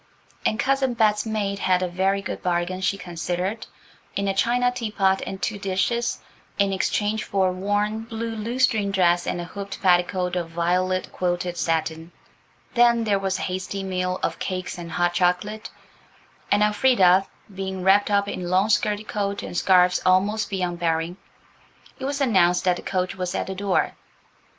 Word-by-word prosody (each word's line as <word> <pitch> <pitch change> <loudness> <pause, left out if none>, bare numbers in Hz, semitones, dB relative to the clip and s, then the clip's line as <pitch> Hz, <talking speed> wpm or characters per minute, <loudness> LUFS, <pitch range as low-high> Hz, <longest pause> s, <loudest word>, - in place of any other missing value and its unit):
And 215 - -1
Cousin 265 -2 +1
Bet's 215 -1 +2
maid 200 -2 -2
had 185 -1 +2
a - - 0
very 190 +3 0
good - - -5
bargain, 180 +1 -1
she 195 +1 0
considered, 180 +3 -3 0.5
in 200 0 -1
a 195 - +1
china 245 +5 +2
teapot 210 -6 0
and 190 - -5
two 210 0 -2
dishes, 205 +5 0 0.4
in 200 -1 +2
exchange 210 +3 0
for 190 -2 +1
a - - -1
worn, 205 +4 -1
blue 230 0 -4
lutestring 225 -1 +1
dress 175 -3 +2
and - - -1
a - - -3
hooped 200 +3 -7
petticoat 180 0 +2
of 170 -2 -2
violet 180 +2 0
quilted 175 0 -2
satin. 165 0 -2 0.6
Then 235 -1 +4
there 205 -3 +1
was 195 -1 -1
a - - -4
hasty 185 +1 -3
meal 185 -1 -2
of - - -1
cakes 185 -1 -4
and 170 -1 -7
hot 175 0 +1
chocolate, 180 +5 0 0.8
and, 205 +1 +4
Elfrida 205 -4 +4 0.3
being 190 -1 -4
wrapped 200 +2 +4
up 200 -1 +2
in 180 -3 -4
long 190 +4 +2
skirted 210 0 +1
coat 200 -1 -2
and - - -7
scarves 180 0 +4
almost 200 +4 +2
beyond 180 -3 -2
bearing, 165 +1 -1 0.8
it - - -4
was 280 +1 -2
announced 185 -9 +3
that 180 -1 +2
the - - -7
coach 185 -1 -2
was 180 -1 -3
at - - -1
the 190 - -5
door. 195 0 0
190 Hz, 170 wpm, -24 LUFS, 180-210 Hz, 0.8 s, Then